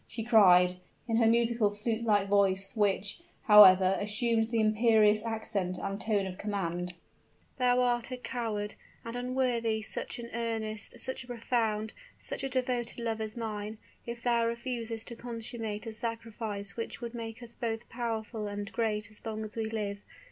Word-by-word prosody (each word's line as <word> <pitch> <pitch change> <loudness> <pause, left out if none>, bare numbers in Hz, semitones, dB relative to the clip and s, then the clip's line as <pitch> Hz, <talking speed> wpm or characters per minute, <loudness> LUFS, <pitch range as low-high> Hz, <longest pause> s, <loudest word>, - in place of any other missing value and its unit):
she 225 0 -5
cried, 180 -6 +6 0.3
in 225 -1 +1
her 230 -1 +5
musical, 230 -1 +3
flute 220 +2 -2
like 205 -3 +3
voice, 195 0 +2
which, 205 - +1 0.2
however, 190 -3 +8
assumed 225 +2 +1
the 230 -1 +1
imperious 215 -1 +4
accent 210 -5 -1
and 195 +2 -3
tone 210 -3 +1
of 185 0 -6
command: 180 -4 -2 0.7
"thou 250 0 +4
art 245 -1 +1
a 255 - -3
coward, 220 -5 -3 0.3
and 230 +1 -5
unworthy 245 -3 0
such - - -4
an 235 -1 -6
earnest 220 -2 -3
such 260 0 -4
a - - -17
profound, 225 -3 -1 0.2
such - - -6
a 270 - -1
devoted 250 -2 -1
love 225 -1 -2
as 220 +1 -5
mine, 215 -1 -4 0.3
if 235 0 -6
thou 235 -1 +3
refusest 235 -1 -3
to 235 - -7
consummate 230 -2 -5
a 225 - -5
sacrifice 220 -3 -4
which 230 - -5
will 235 -1 -5
make 230 +1 -6
us 235 0 -8
both 225 -3 -3
powerful 225 -2 -3
and 205 0 -5
great 215 -2 -1
as 215 - -6
long 220 -1 -4
as 210 - -6
we 225 -1 -1
live! 210 -2 -3
225 Hz, 165 wpm, -30 LUFS, 210-235 Hz, 0.7 s, however